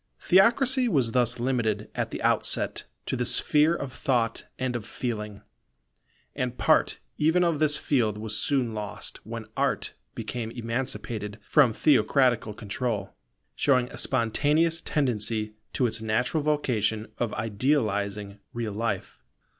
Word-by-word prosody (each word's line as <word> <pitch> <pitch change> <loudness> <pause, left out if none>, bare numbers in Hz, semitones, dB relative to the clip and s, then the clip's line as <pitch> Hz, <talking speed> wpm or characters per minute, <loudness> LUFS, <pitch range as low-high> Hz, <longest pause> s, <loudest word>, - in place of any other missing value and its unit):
Theocracy 245 +7 +4
was 135 - +1
thus 120 -1 +2
limited 115 -4 -1
at - - -2
the - - -6
outset - - 0 0.2
to - - -2
the 125 - -1
sphere 150 +6 +4
of 140 -6 -5
thought 120 -5 0
and 130 -1 -2
of 120 - -3
feeling; 105 -3 -5 0.9
and - - -2
part - - +3 0.2
even 160 +4 +3
of 165 -4 +1
this 150 -1 +3
field 110 -7 +1
was 110 0 -3
soon 125 -2 +1
lost 105 -1 -6
when 115 0 -6
Art - - 0 0.2
became 120 -2 -4
emancipated 115 -3 -3
from 140 -6 +5
theocratical 125 -4 +2
control, 105 -1 -3 0.4
showing 125 -3 +2
a - - -9
spontaneous 150 +7 +2
tendency 110 -8 -1 0.2
to 130 - +1
its 110 -1 -1
natural 125 +8 0
vocation 115 -8 0
of 120 -3 0
idealizing 105 -3 -1
real 115 -3 -3
life. 105 - -3
120 Hz, 130 wpm, -27 LUFS, 110-140 Hz, 0.9 s, from